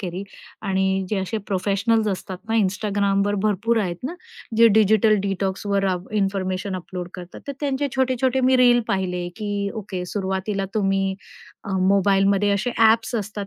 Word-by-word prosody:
केली. 185 -1 -4 0.4
आणि 190 0 0
जे 210 - 0
असे 190 +4 -2
प्रोफेशनल्स 200 +3 +1
असतात 190 -1 -4
ना, 225 - 0
Instagramवर 200 0 0
भरपूर 215 +3 +1
आहेत 175 -3 -2
ना, 270 +7 -4 0.4
जे 230 - +7
डिजिटल 215 0 +4
डिटॉक्सवर 195 +1 -1
रा 190 -1 +2 0.3
इन्फॉर्मेशन 195 0 -2
अपलोड 180 0 -6
करतात. 180 -1 -9
तर - - -1
त्यांचे 285 -1 -1
छोटे-छोटे 260 0 +1
मी 260 0 +4
रील 245 -1 +5
पाहिले 180 -2 -1
की 205 -2 -2
ओके, 190 -4 -5
सुरुवातीला 195 +1 -2
तुम्ही 195 -2 +1 0.5
अ, - - -6 0.2
मोबाईलमध्ये 195 +1 +3
असे 200 +5 0
ॲप्स 225 +1 +4
असतात 205 -2 -3
200 Hz, 145 wpm, -22 LUFS, 190-220 Hz, 0.5 s, जे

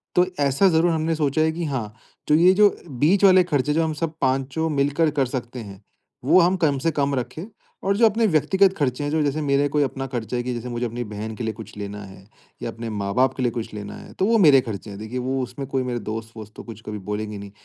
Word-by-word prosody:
तो 180 - +5
ऐसा 140 +6 +3
ज़रूर 170 0 +3
हमने 160 0 0
सोचा 150 -1 +1
है 160 0 +3
कि 170 +1 -4
हाँ, 120 -8 -3 0.3
तो 150 - +4
ये 175 +4 +6
जो 205 +1 +6 0.2
बीच 150 +10 +2
वाले 185 -2 +7
खर्चे, 150 -3 0
जो 165 +2 +2
हम 160 -1 -1
सब 160 +1 -3
पाँचों 135 +4 0
मिलकर 145 +2 +1
कर 135 - +3
सकते 125 0 -5
हैं, 100 -4 -10 0.4
वो 165 +7 +6
हम 180 +2 +3
कम 150 -6 +1
से 165 +5 +1
कम 140 0 +1
रखें 135 +7 -4 0.4
और 195 +1 +1
जो 230 - +5
अपने 225 +1 +3
व्यक्तिगत 190 +6 +3
खर्चे 135 -2 -1
हैं, 145 - -1
जो 160 0 +1
जैसे 145 +2 -1
मेरे 140 0 +2
कोई 145 +1 +2
अपना 135 -1 -3
खर्चा 120 -1 -4
है, 120 - -2
कि 125 - -3
जैसे 120 +1 -5
मुझे 120 0 -2
अपनी 120 +1 -4
बहन 105 0 -6
के 115 - -6
लिए 110 - -2
कुछ - - -11
लेना 105 0 -6
है, 95 -1 -13 0.4
या - - -3
अपने 115 0 -6
माँ-बाप 105 +5 0
के 130 - -3
लिए 120 - +1
कुछ 115 -2 -5
लेना 105 -1 -7
है, - - -12
तो 190 - 0
वो 230 +2 +3
मेरे 145 -9 +6
खर्चे 110 -3 -6
हैं। 100 0 -8
देखिए 110 +4 -5
वो 130 +1 -1
उसमें 130 +2 -6
कोई 135 -1 -1
मेरे 125 -1 -3
दोस्त-वोस्त 110 0 -7
तो - - -9
कुछ 115 -2 -10
कभी 105 0 -5
बोलेंगे 105 0 -3
नहीं। 100 0 -9
135 Hz, 255 wpm, -23 LUFS, 115-160 Hz, 0.4 s, वाले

